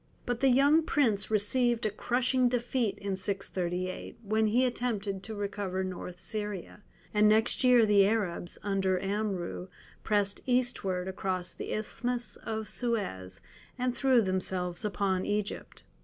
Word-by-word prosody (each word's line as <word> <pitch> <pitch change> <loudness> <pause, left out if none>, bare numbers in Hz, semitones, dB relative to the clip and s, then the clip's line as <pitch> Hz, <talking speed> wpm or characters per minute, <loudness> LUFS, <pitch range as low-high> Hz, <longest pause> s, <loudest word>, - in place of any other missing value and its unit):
But 245 -1 -1
the 270 - +4
young 280 +5 +5
prince 245 -10 +1
received 235 +3 +2
a 215 - +1
crushing 250 +3 +1
defeat 240 -3 0
in 200 -1 -3
638, 185 -2 -3
when 215 +1 +2
he 245 +5 +3
attempted 215 -6 -2
to 220 +2 -7
recover 200 -2 -2
North 180 -1 -6
Syria, 210 -2 -4 0.3
and 210 0 +5
next 220 +5 +3
year 250 -3 +6
the 200 -2 +5
Arabs, 195 -5 -1
under 190 -2 +1
Amrou, 195 -3 -2 0.4
pressed 205 -2 +1
eastward 240 -8 +1
across 185 -1 -3
the - - -6
Isthmus 240 +3 -3
of 220 -1 -4
Suez, 95 - -3 0.4
and 250 -1 -1
threw 260 -4 +4
themselves 185 -2 -2
upon 195 -3 0
Egypt. 205 0 -3
210 Hz, 135 wpm, -30 LUFS, 190-240 Hz, 0.4 s, year